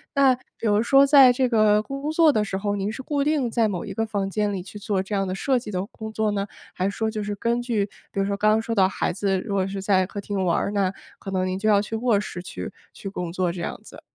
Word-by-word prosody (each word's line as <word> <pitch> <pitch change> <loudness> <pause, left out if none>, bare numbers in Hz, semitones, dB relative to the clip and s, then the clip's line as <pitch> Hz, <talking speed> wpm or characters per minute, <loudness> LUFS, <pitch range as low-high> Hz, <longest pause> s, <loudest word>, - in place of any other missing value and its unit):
那 275 -2 +5 0.3
比 - - -5
如 210 0 +3
说 275 +3 +5
在 270 -3 +8
这 255 +1 +1
个 215 -2 +3
工 275 +3 -5
作 315 -1 +5
的 215 - +2
时 190 -2 -3
候， 205 +1 -1
您 200 +1 -2
是 260 +4 -7
固 285 -1 0
定 285 -6 +1
在 225 -2 +2
某 180 -4 -3
一 - - -6
个 225 0 -1
房 200 -3 -2
间 210 0 0
里 190 -3 -4
去 210 +2 -10
做 195 -2 -1
这 200 - -7
样 195 -1 0
的 185 - -3
设 255 +5 +1
计 225 - -9
的 185 0 -2
工 220 0 -8
作 220 -1 0
呢？ 200 0 -2 0.3
还 185 - -2
是 - - -3
说 220 +2 -1
就 215 -1 -4
是 205 0 -3
根 235 +3 0
据 230 -5 0 0.3
比 - - -3
如 195 - +2
说 200 0 -1
刚 215 +1 +3
刚 220 +1 +3
说 230 0 -3
到 190 -3 +4
孩 - - -1
子 195 0 0
如 205 -1 -5
果 190 -1 +1
是 195 0 -5
在 190 -2 +2
客 200 - -6
厅 200 -1 -2
玩 170 - +2
儿 200 - -1
呢， 195 -2 0 0.3
可 195 - -7
能 185 -1 0
您 185 +1 -2
就 215 - -1
要 205 -1 +5
去 225 +2 -5
卧 225 -3 +2
室 190 -3 -6
去 180 - -7 0.2
去 195 - -7
工 180 -3 -4
作， 185 -2 0
这 175 -1 -6
样 - - -4
子？ - - -13
210 Hz, 315 characters per minute, -24 LUFS, 195-230 Hz, 0.3 s, 在